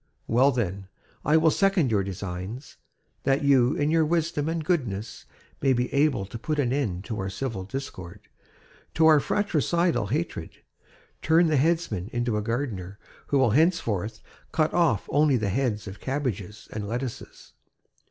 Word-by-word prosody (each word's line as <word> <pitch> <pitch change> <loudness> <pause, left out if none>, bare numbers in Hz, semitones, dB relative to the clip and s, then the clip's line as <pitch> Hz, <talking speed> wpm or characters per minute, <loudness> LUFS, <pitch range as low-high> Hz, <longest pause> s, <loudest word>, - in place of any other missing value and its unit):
Well 130 +4 +4
then, 100 -6 -3 0.4
I 155 +2 +4
will 160 0 +4
second 195 - +2
your 105 -2 +3
designs; 95 +6 -6 0.4
that 135 +1 +1
you, 135 -2 +4
in 145 +1 +1
your 165 0 +4
wisdom 160 -1 0
and 165 -1 -2
goodness, 120 - -2 0.4
may 135 -1 +3
be 125 0 -1
able 140 -7 +2
to 115 +4 -8
put 155 +6 -2
an 130 -4 +1
end 105 -11 -1
to 110 -2 -4
our 95 0 -2
civil 100 -2 -4
discord, 100 -6 -7 0.7
to 160 - +4
our 155 -2 +7
fratricidal 170 - +1
hate, 145 - -3 0.7
turn 165 +2 +4
the 155 - +2
headsman 135 - 0
into 120 -2 -1
a 105 - 0
gardener 105 -5 -3 0.3
who 140 - +2
will 130 -4 +4
henceforth 115 - +1 0.3
cut 155 0 +1
off 160 - +2
only 145 -2 +4
the 105 -3 -1
heads 110 -1 -1
of 95 0 -8
cabbages 120 -7 -4
and 105 -1 -4
lettuces. 120 +2 -6
130 Hz, 155 wpm, -26 LUFS, 105-155 Hz, 0.7 s, our